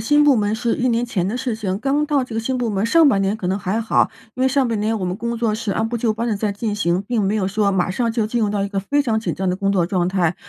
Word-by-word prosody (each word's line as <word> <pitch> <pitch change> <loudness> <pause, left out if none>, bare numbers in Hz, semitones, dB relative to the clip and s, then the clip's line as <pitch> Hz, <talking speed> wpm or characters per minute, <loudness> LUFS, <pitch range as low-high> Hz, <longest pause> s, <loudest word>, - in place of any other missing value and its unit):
新 295 +6 +3
部 285 -2 +6
门 210 -2 +1
是 230 +1 0
1 255 - 0
年 240 0 +1
前 195 -7 -1
的 235 - -2
事 255 -3 -2
情。 200 -3 -3
刚 280 +5 +1
到 290 -3 +1
这 235 - -9
个 225 - 0
新 255 +3 -2
部 240 -2 -1
门， 200 0 -1
上 320 +5 +5
半 195 -6 +2
年 195 +2 0
可 185 - -5
能 190 +2 0
还 200 +3 -2
好， 225 - +2 0.2
因 255 - -2
为 260 - +4
上 270 0 +2
半 225 -3 -1
年 220 +1 0
我 190 - -3
们 180 0 -2
工 235 +2 -3
作 225 -2 0
是 220 -1 -3
按 220 +3 0
部 235 - -2
就 225 -1 +1
班 230 +2 -3
地 220 -3 0
在 210 0 -1
进 205 +1 -3
行， 175 -3 0
并 235 -3 0
没 200 +2 +1
有 190 -3 0
说 205 +1 +1
马 190 -3 +1
上 230 +5 0
就 225 -2 0
进 235 +2 -1
入 210 - +1
到 205 -1 -1
一 - - -3
个 195 -1 -2
非 285 +9 0
常 225 -6 0
紧 230 - -2
张 190 0 -2
的 180 - +1
工 195 +1 -1
作 180 -4 +2
状 180 -2 0
态。 180 -3 +1
220 Hz, 355 characters per minute, -20 LUFS, 195-240 Hz, 0.2 s, 部